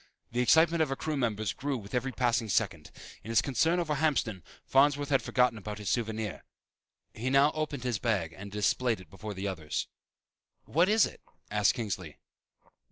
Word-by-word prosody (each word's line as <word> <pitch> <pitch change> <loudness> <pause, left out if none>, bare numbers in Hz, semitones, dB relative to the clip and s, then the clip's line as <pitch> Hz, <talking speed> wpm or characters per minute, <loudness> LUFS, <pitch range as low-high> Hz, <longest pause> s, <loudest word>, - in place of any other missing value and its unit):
The 120 - -2
excitement 160 +6 +4
of 155 - +2
her 135 - -1
crew 155 +2 -3
members 110 -8 -1
grew 140 +7 -2
with 100 -3 -11
every 125 +2 0
passing 120 -3 0
second. 90 -7 0 0.3
In 110 - -9
his 115 - +4
concern 160 +6 +2
over 160 -3 0
Hamston, 135 - 0 0.2
Farnsworth 145 +1 +3
had 135 -2 +3
forgotten 125 -3 +2
about 105 +1 -6
his 105 -1 -3
souvenir. 110 -3 -2 0.7
He 120 +4 -3
now 140 +2 +5
opened 150 -4 -3
his 120 -5 -1
bag 95 -9 0
and 100 +1 -9
displayed 110 +3 +1
it 95 - -15
before 105 +1 -7
the 95 +2 -3
others. 80 -6 -3 0.8
"What 170 +6 +2
is 220 +1 +5
it?" - - -9 0.3
asked 105 -1 +3
Kingsley. 95 - -4
120 Hz, 175 wpm, -30 LUFS, 105-140 Hz, 0.8 s, now